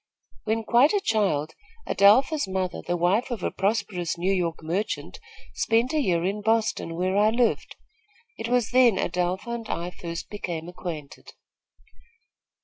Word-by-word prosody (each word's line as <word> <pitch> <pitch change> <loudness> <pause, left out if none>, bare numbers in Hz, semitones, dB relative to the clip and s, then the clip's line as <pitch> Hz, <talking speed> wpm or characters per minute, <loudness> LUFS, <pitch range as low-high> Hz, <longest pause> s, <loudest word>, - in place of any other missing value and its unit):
When 225 +1 0
quite 245 - +4
a 410 - +3
child, 195 - 0 0.3
Adelpha's 260 +8 +4
mother, 185 -1 -2
the 175 - -2
wife 190 +9 +1
of 235 -7 -4
a - - 0
prosperous 190 -4 -1
New 185 +3 +1
York 170 -4 -2
merchant, 180 - -3 0.3
spent 230 +5 +1
a 310 - +2
year 175 -8 +1
in 200 +2 -2
Boston 220 -6 0
where 185 +2 0
I 210 +1 +4
lived. 235 +1 0 0.6
It 225 - -5
was 245 -3 +1
then 245 -5 +5
Adelpha 180 +6 -1
and 235 -2 -5
I 175 +1 -3
first 170 -1 -7
became 170 -5 -5
acquainted." 165 -5 -8
195 Hz, 145 wpm, -25 LUFS, 175-225 Hz, 0.6 s, then